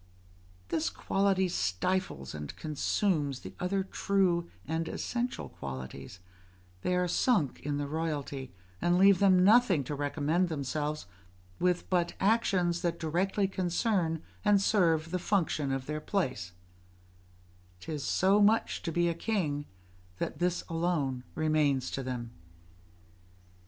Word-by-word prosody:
This 165 -1 0
quality 195 -1 +1
stifles 95 - -1
and 75 -1 -6
consumes 150 -2 0
the - - -9
other 190 +2 0
true 185 -3 +1 0.2
and 160 +1 -1
essential 245 0 -3
qualities: 65 +5 -8 0.6
they 180 - 0
are 180 0 +1
sunk 175 - +1
in 145 0 -2
the 145 0 -2
royalty, 145 -4 -3 0.3
and 175 0 +3
leave 195 0 +6
them 185 -2 +5
nothing 205 - +5
to 140 - -5
recommend 150 +5 0
themselves 150 - -2 0.5
with 180 0 +1
but 175 -1 +1
actions 190 -5 +2
that 170 -1 -1
directly 185 +5 0
concern 180 -3 0 0.2
and 205 -1 +5
serve 165 -6 +2
the 185 - 0
function 165 -7 0
of 135 -1 -2
their 150 +1 -4
place; 130 - -2 1.3
'tis 150 - -5
so 195 +7 +3
much 215 +2 +3
to 165 - -3
be 175 +1 +2
a 170 - +1
king, 165 -6 -1 0.5
that - - -4
this 175 0 0
alone 165 -7 -1
remains 150 -4 +1
to 135 - -3
them. 125 -3 -4
165 Hz, 125 wpm, -30 LUFS, 145-190 Hz, 1.3 s, leave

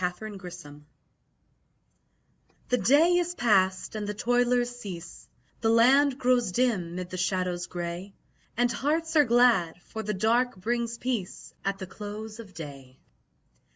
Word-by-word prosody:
Eventide 180 -5 -6 1.9
The 250 - +3
day 325 +7 +5
is 350 0 -1
past 190 - +2
and 210 -1 -4
the 210 - -3
toilers 245 +2 +1
cease; 180 -8 -9 0.3
The 225 - +1
land 260 +4 +5
grows 250 -5 +2
dim 190 -8 0
'mid 180 0 -5
the 185 - -4
shadows 180 -1 -1
grey, 175 +2 -6 0.4
And 245 0 +2
hearts 320 +6 -1
are 300 -2 +6
glad, 230 -9 +3
for 220 - -6
the 210 -1 -3
dark 235 +5 +2
brings 235 +4 -2
peace 235 -8 -4
At 195 0 -1
the 190 - -6
close 210 +3 -8
of 200 -5 -11
day. 135 -5 -9
215 Hz, 135 wpm, -27 LUFS, 185-245 Hz, 1.9 s, are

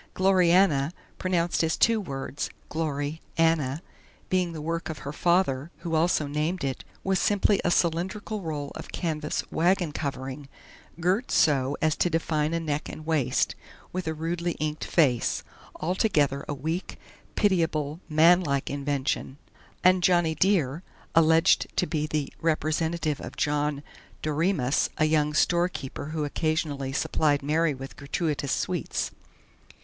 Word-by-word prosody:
"Gloriana" 180 -5 +4 0.3
pronounced 175 -2 +1
as 160 0 +1
two 225 -1 +3
words: 135 -4 -4 0.2
"Glory 150 -1 -2 0.2
Anna" 160 -2 +2 0.5
being 180 -2 +2
the 160 - -6
work 165 +3 -3
of 160 - -4
her 140 - -4
father, 170 -5 +1
who 170 -1 -4
also 160 -1 +2
named 150 +4 -2
it, 135 -1 -3 0.2
was 190 -1 +1
simply 205 0 +2
a - - +2
cylindrical 185 +5 0
roll 150 -4 -4
of - - -8
canvas 155 -3 -2
wagon 175 -1 +2
covering, 135 -1 -5 0.5
girt 185 +8 +1
so 140 -2 +3
as 155 -1 +3
to 175 - +2
define 160 -2 0
a - - 0
neck 150 -2 -3
and 155 - -8
waist, 145 -6 +1 0.4
with 185 -2 -3
a 160 - -1
rudely 170 +2 -2
inked 155 0 -3
face 135 -8 +2 0.3
altogether 155 -6 +1
a - - 0
weak, 160 +7 -4 0.4
pitiable, 165 -6 +1
manlike 155 -3 +4
invention; 140 -1 -2 0.5
and 185 0 +5
"Johnny 175 -3 +3
Dear," 165 -5 +1 0.3
alleged 165 +2 +5
to - - +3
be 155 -3 -1
the 150 -2 -2
representative 160 -1 0
of - - -8
John 145 -1 0 0.4
Doremus, 155 -3 +1
a 155 - +3
young 150 -1 +2
storekeeper 170 -5 0
who 155 0 -3
occasionally 145 -3 -1
supplied 145 +1 +1
Mary 155 +1 +1
with 135 +1 -9
gratuitous 145 -1 -2
sweets. 175 -6 -1
160 Hz, 135 wpm, -27 LUFS, 145-175 Hz, 0.5 s, and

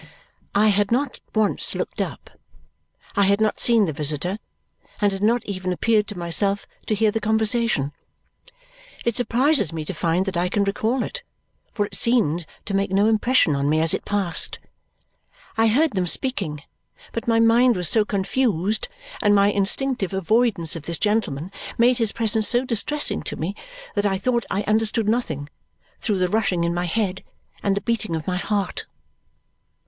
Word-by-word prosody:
I 215 +2 +5
had 205 +1 +1
not 260 +3 0 0.2
once 215 -2 +2
looked - - -3
up. - - -6 0.8
I 200 -1 +4
had 200 +1 +3
not 215 -1 +1
seen 230 -3 +4
the 160 - -3
visitor 155 +7 -2 0.6
and 205 -1 +2
had 195 0 -5
not 230 +2 +2
even 185 -2 -3
appeared 210 +3 +1
to 210 - -8
myself 195 +4 0 0.2
to 215 - +1
hear 215 0 +2
the 225 - -1
conversation. 220 - +1 1.1
It 235 -2 +1
surprises 250 - +2
me 160 -2 -5
to 190 - -4
find 170 +2 0
that 195 -1 -3
I 175 +1 0
can 200 +2 +1
recall 220 +5 0
it, 485 - -6 0.5
for 210 -3 -1
it - - -12
seemed 175 -9 +1 0.2
to 200 - -4
make 195 0 +1
no 195 +2 +2
impression 220 - +3
on 140 +1 0
me 155 +1 +2
as 160 0 +2
it - - -2
passed. 195 -5 0 1.0
I 225 0 +3
heard 285 +8 +3
them 185 -3 -1
speaking, 170 - -1 0.5
but 230 - -5
my 230 -1 +3
mind 230 +2 +5
was 180 -2 -1
so 220 +4 +5
confused 205 -1 0 0.3
and 205 -1 +4
my 200 0 +4
instinctive 205 0 0
avoidance 195 -4 +1
of 160 -3 -8
this 170 -1 0
gentleman 195 -6 -1 0.3
made 245 +2 +4
his 225 -2 +2
presence 220 -1 +3
so 245 +2 +4
distressing 260 +5 0
to - - -5
me 180 +6 -4 0.4
that 205 0 +1
I 195 -1 0
thought 235 +4 -1
I 200 - -1
understood 220 0 +1
nothing, 160 - -1 0.5
through 210 -4 0
the 185 0 +1
rushing 185 -3 0
in 170 0 0
my 175 +1 -1
head 190 +1 -1 0.4
and 200 -1 0
the - - -1
beating 220 -7 -2
of 160 - -4
my 180 -1 -1
heart. 200 +2 -2
205 Hz, 175 wpm, -22 LUFS, 180-225 Hz, 1.1 s, I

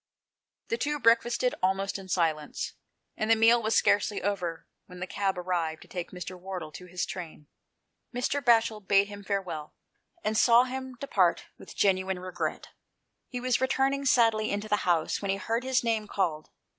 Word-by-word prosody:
The 230 - -1
two 295 +3 0
breakfasted 235 +1 +3
almost 195 +2 0
in 190 -1 -11
silence, 160 -4 -1 0.4
and 215 - -2
the 225 - +7
meal 230 +2 +5
was 220 0 0
scarcely 205 0 +3
over 180 -4 -2 0.2
when 180 0 -11
the 185 - -3
cab 195 0 -1
arrived 175 -3 -2
to - - -18
take 175 -2 -5
Mr. 180 0 -7
Wardle 180 -4 -6
to 180 +4 -10
his 180 +1 -2
train. 165 -4 -8 0.7
Mr. 250 +3 -1
Batchel 225 -3 +4
bade 200 0 +4
him 205 0 -9
farewell, 185 -7 -4 0.5
and 215 - 0
saw 235 +2 +6
him 260 0 -5
depart 190 -11 +1
with - - -12
genuine 190 -1 +2
regret; 185 0 -4 0.6
he 250 - -5
was 250 0 +1
returning 270 +1 +1
sadly 225 -4 +3
into 205 +1 -2
the 210 -1 +2
house 165 -2 +1
when 200 - -3
he 195 - +1
heard 225 +5 -2
his 260 -1 +1
name 225 -2 0
called. 165 -7 -1
200 Hz, 170 wpm, -28 LUFS, 180-230 Hz, 0.7 s, the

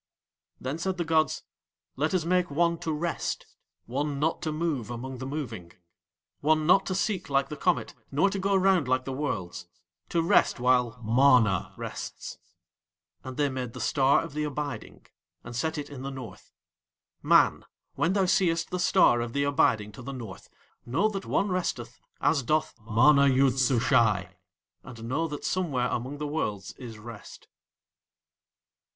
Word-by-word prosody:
Then 135 +5 -4
said 190 +2 -2
the 170 - -1
gods: 160 -2 +1 0.5
"Let 155 +6 0
Us 170 -3 0
make 180 0 +2
one 170 +3 +1
to 160 - -3
rest. 165 +3 -2 0.4
One 140 +4 -2
not 160 +3 0
to 155 - -2
move 155 -8 -2
among 125 +2 -6
the 130 - -5
moving. 115 - -6 0.7
One 155 +1 +2
not 180 +4 +4
to 185 - -1
seek 190 -3 -1
like 140 0 +1
the 150 - -5
comet, 115 -5 0 0.2
nor 145 +8 +3
to 195 - -3
go 195 +1 +1
round 190 -6 +3
like 130 0 +1
the 135 - -4
worlds; 100 -10 -4 0.4
to 165 -1 +1
rest 165 - +3
while 125 -1 +2
MANA 115 -4 +3
rests." - - -7 0.8
And 130 -1 -8
They 145 -1 +2
made 130 -3 -4
the - - -8
Star 135 -1 +3
of 165 -3 -8
the 150 0 -2
Abiding 145 -1 -5 0.4
and 120 0 -8
set 160 +6 -1
it 145 0 -6
in 135 -3 -8
the 135 - -4
North. 130 -8 -10 0.7
Man, - - +4 0.3
when 170 +3 +1
thou 195 -1 +2
seest 175 -3 +1
the 180 - -2
Star 120 -8 +4
of 120 -1 -4
the 140 - +1
Abiding 125 -8 +2
to 115 - -11
the 135 +3 -6
North, 115 -7 -9 0.3
know 165 - +1
that 200 -2 -5
one 200 - +1
resteth 135 -10 -3 0.2
as 145 -1 +2
doth 155 +5 0
MANA 140 +6 +5
YOOD 135 -1 +3
SUSHAI, 115 -6 +2 0.5
and 115 -3 -11
know 145 +8 -1
that 145 -2 -6
somewhere 140 -10 0
among 130 +5 -3
the 150 - -4
Worlds 105 -10 -3
is 120 -4 -8
rest. 110 0 -11
140 Hz, 165 wpm, -27 LUFS, 120-160 Hz, 0.8 s, MANA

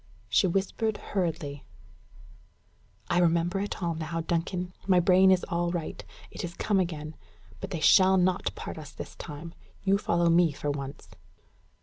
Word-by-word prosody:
She 110 - +4
whispered 200 +4 -1
hurriedly: 160 -7 -3 1.4
"I 175 - +2
remember 175 +2 +2
it 200 -2 -4
all 170 -1 0
now, 165 +1 -3
Duncan. 175 +2 -2
My 185 -2 +5
brain 185 +2 +5
is 185 -1 +3
all 175 -1 0
right. 170 -2 -4 0.3
It - - -6
is 170 -1 -5
come 205 -2 +1
again. 155 -4 -3 0.4
But - - -6
they 170 -4 -4
shall 190 +3 +6
not 185 0 +1
part - - -7
us 150 -1 -9
this - - -8
time. 165 +2 -8 0.3
You 195 0 +3
follow 170 -3 +1
me 170 -2 +4
for 145 +1 -2
once." 140 -1 -6
175 Hz, 155 wpm, -28 LUFS, 160-185 Hz, 1.4 s, shall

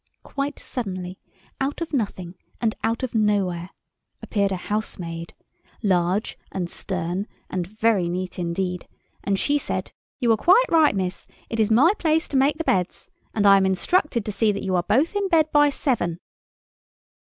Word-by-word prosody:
Quite 280 +1 -3
suddenly, 185 -6 -5 0.4
out 275 +2 -1
of 335 -2 -5
nothing 195 -8 -2 0.3
and 225 -2 +1
out 230 +3 0
of 255 - -3
nowhere, 195 -5 +1 0.5
appeared 200 -2 0
a - - 0
housemaid—large 180 0 -3
and 180 -3 -3
stern 185 +2 -3 0.2
and 180 -2 -2
very 215 -3 +1
neat 180 +1 -4
indeed, 180 +1 -2 0.4
and 200 -1 +1
she 290 +7 +1
said— - - -4 0.3
"You 240 -3 +3
are - - +1
quite 375 - +5
right, 315 -9 +5
miss; 185 -1 -3 0.2
it 225 - -2
is 215 -1 +3
my 270 - +5
place 320 0 +2
to - - -4
make 280 +3 +3
the 325 - -2
beds. 180 - -1 0.2
And 205 -2 +2
I 200 0 +8
am 190 - +3
instructed 235 - +1
to 210 - -2
see 215 +1 +2
that 200 - -4
you 190 -1 0
are 175 - +3
both 275 - +1
in 405 -1 +1
bed 315 -4 +3
by 290 0 +5
seven." 230 - -1
210 Hz, 165 wpm, -24 LUFS, 185-270 Hz, 0.5 s, I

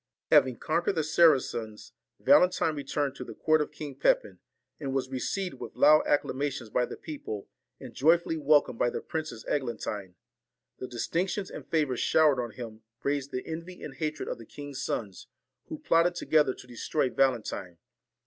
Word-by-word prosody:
Having 130 -2 +5
conquered 170 +4 0
the 160 - +1
Saracens, 135 -9 +2 0.3
Valentine 180 -3 +4
returned 140 0 -2
to - - -5
the - - -9
court 155 -1 +3
of 150 - -3
King 145 -2 -7
Pepin, - - +1 0.4
and 135 -3 -3
was 130 -1 -1
received 180 +8 -3
with - - -8
loud 155 0 +6
acclamations 140 -4 -1
by 125 - +1
the - - -8
people, 120 -10 -7 0.3
and 125 -3 -10
joyfully 165 +3 +3
welcomed 150 -5 +3
by 120 - +3
the - - -4
Princess 155 -8 -5
Eglantine. 105 -8 -3 0.6
The 130 - -5
distinc 165 +10 -1
tions 200 -1 -4
and - - -9
favour 150 -6 +1
showered 150 -3 +4
on 120 - -4
him 110 -1 -9 0.2
raised 140 -1 -1
the 130 -1 -4
envy 170 +3 -7
and 145 - -6
hatred 155 0 -3
of - - -4
the 115 - -10
king's 145 -2 -7
sons, 100 -4 -4 0.4
who - - -6
plotted 170 +1 +2
together 150 -6 +2
to - - -13
destroy 125 +2 -1
Valentine. 115 -9 0
145 Hz, 170 wpm, -29 LUFS, 125-155 Hz, 0.6 s, loud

